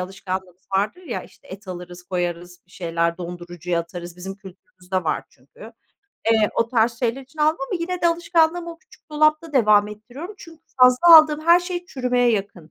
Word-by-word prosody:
alışkanlığımız 185 -1 -6
vardır 210 - -1
ya: 275 -10 -5
İşte, - - -20
et 195 +1 -11
alırız 180 0 -8
koyarız, 175 -1 -4
bir - - -29
şeyler 170 -1 -2
dondurucuya 175 -1 -4
atarız; 175 +1 -9
bizim 190 +2 -7
kültürümüzde 185 -1 -7
var 155 - -1
çünkü. 145 - -15 0.6
Eee, 220 -2 +3
o 230 - +1
tarz 230 -1 +2
şeyler 245 +1 -1
için 275 +4 -21
aldım 310 +2 +3
ama 375 - -1
yine 360 +1 -3
de 340 - +5
alışkanlığımı 335 0 +1
o 330 - -17
küçük 315 - -23
dolapta 305 +1 +2
devam 210 -5 +4
ettiriyorum 245 - -9
çünkü 325 -1 -14 0.2
fazla 255 +7 +8
aldığım 310 -1 +5
her 345 +1 +7
şey 355 0 -5
çürümeye 250 -4 +1
yakın. 195 -7 -4
215 Hz, 175 wpm, -22 LUFS, -, 0.6 s, fazla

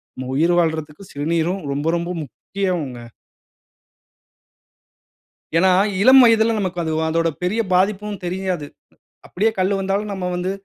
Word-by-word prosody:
நம்ம 130 0 -6
உயிர் 170 +3 +3
வாழ்றதுக்கு 160 0 -2
சிறுநீரும் 165 +5 -1
ரொம்ப 145 +3 -3
ரொம்ப 170 +1 -4
முக்கியங்க. 165 -3 -4 2.6
ஏனா, 190 +2 +4 0.3
இளம் 260 +4 +8
வயதுல 225 -1 +4
நமக்கு 185 -2 -3
அது 160 -1 -2 0.2
அதோட 165 +1 +1
பெரிய 195 +6 0
பாதிப்பும் 205 +2 0
தெரியாது. 180 -3 -3 0.6
அப்டியே 215 +5 0
கல்லு 190 +2 +1
வந்தாலும், 195 +2 -2
நம்ம 190 -2 -5
வந்து 180 +1 -2
180 Hz, 120 wpm, -20 LUFS, 165-200 Hz, 2.6 s, இளம்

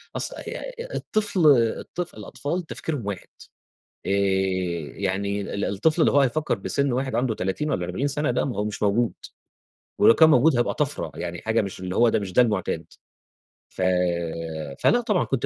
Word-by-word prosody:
أص - - -2 0.2
ي - - -4 0.4
الطفل 205 -7 +1 0.3
الطفل 175 -1 -6
الأطفال 170 +5 -4
تفكيرهم 150 -9 -4
واحد. 100 -3 -5 0.8
آآ - - -3 0.9
يعني 100 +1 -1
ال 100 0 -3
الطفل 155 - +1
اللي - - +4
هو 145 - +4
هيفكّر 140 +1 +1
بسِن 140 +7 -1
واحد 130 +2 -1
عنده 120 -3 0
30 95 +12 -2
والّا 90 -8 -1
40 95 +11 -2
سَنة، 150 +1 0
لأ - - 0
ما 130 - -3
هو 105 - 0
مش 105 0 -4
موجود. 110 +3 +2 0.9
ولو 115 - +7
كان 160 -1 +6
موجود 140 -1 +5
هيبقى 120 - +1
طَفرة. 145 -2 -2
يعني 85 0 -5
حاجة 110 0 +1
مش 100 -2 -6
اللي 90 0 -4
هو 120 -1 +5
ده - - +1
مش 95 -3 -6
ده 125 - +6
المُعتاد. 105 -6 0 0.9
ف - - -6 1.0
فلأ 245 - +4
طبعًا 210 -6 +1
كنت 135 -3 -1
120 Hz, 170 wpm, -24 LUFS, 100-150 Hz, 1.0 s, ولو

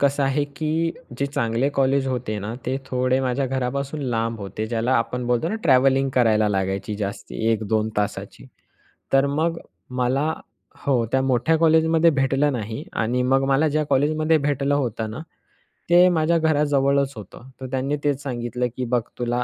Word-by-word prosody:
कसं 140 0 +2
आहे 135 +2 +1
की 160 +2 0 0.3
जे 140 - 0
चांगले 120 -1 0
कॉलेज 135 0 +2
होते 125 -5 -2
ना 105 +3 -5
ते 130 +1 0
थोडे 130 0 +1
माझ्या 130 +1 0
घरापासून 135 +3 -3
लांब 115 -3 -2
होते. 100 +2 -5
ज्याला 115 +2 -1
आपण 120 +2 -2
बोलतो 125 +6 +1
ना 205 - -2
ट्रॅव्हलिंग 135 -1 +4
करायला 110 -4 +3
लागायची 95 +1 -2
जास्ती 100 +1 -5
1-2 110 0 0
तासाची. 105 -1 -3 0.7
तर 135 +1 +5
मग 160 +4 0 0.3
मला 130 +5 0 0.5
हो 125 -4 +2
त्या 130 - +2
मोठ्या 130 +4 +2
कॉलेजमध्ये 160 +1 +4
भेटलं 135 +1 +1
नाही 110 -2 -4
आणि 120 +3 0
मग 135 +1 +2
मला 140 +3 +3
ज्या 155 +1 0
कॉलेजमध्ये 155 +3 +2
भेटलं 145 -1 0
होतं 115 -5 -2
ना 110 - -6 0.7
ते 175 +1 +7
माझ्या 165 -1 +2
घराजवळच 140 -3 +2
होतं. 110 +4 -11
तर - - -5
त्यांनी 135 +2 -1
तेच 145 -2 0
सांगितलं, 125 -1 -2
की 130 - -2
बघ 120 0 +1 0.2
तुला 120 0 0
130 Hz, 160 wpm, -23 LUFS, 120-145 Hz, 0.7 s, ते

